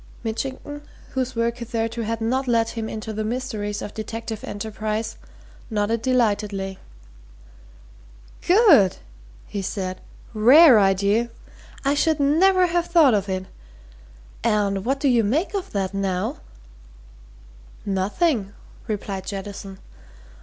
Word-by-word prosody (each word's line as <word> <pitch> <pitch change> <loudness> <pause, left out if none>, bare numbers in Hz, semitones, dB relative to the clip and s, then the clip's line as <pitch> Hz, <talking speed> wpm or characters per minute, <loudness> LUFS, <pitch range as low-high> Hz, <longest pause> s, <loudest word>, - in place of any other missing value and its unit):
Mitchington, 265 +5 -4 0.3
whose 260 -1 -2
work 230 +1 0
hitherto 230 -1 -3
had 225 +1 -3
not 255 +4 0
led 230 -2 +2
him 225 -1 -4
into 220 0 -5
the 215 +1 -2
mysteries 215 -3 -3
of 210 - -7
detective 225 0 -6
enterprise, 215 +1 -4 0.5
nodded 215 +1 0
delightedly. 205 -6 0 1.7
"Good!" 350 - +6 0.5
he 205 -1 -5
said. 185 -1 -4 0.3
"Rare 250 +4 +8
idea! 200 +4 +2 0.6
I 275 - +3
should 310 +1 +1
never 365 +7 +4
have 345 0 0
thought 320 -7 +5
of 200 -1 0
it! 185 0 -2 1.0
And 205 -4 +1
what 270 +2 0
do 280 - +1
you 240 -3 +4
make 290 - 0
out 395 -3 -2
of - - -20
that, 195 -1 -1
now?" 195 +5 -2 1.5
"Nothing," 205 - 0 0.3
replied 195 -3 -4
Jettison. 195 -1 -6
225 Hz, 120 wpm, -23 LUFS, 205-260 Hz, 1.7 s, Rare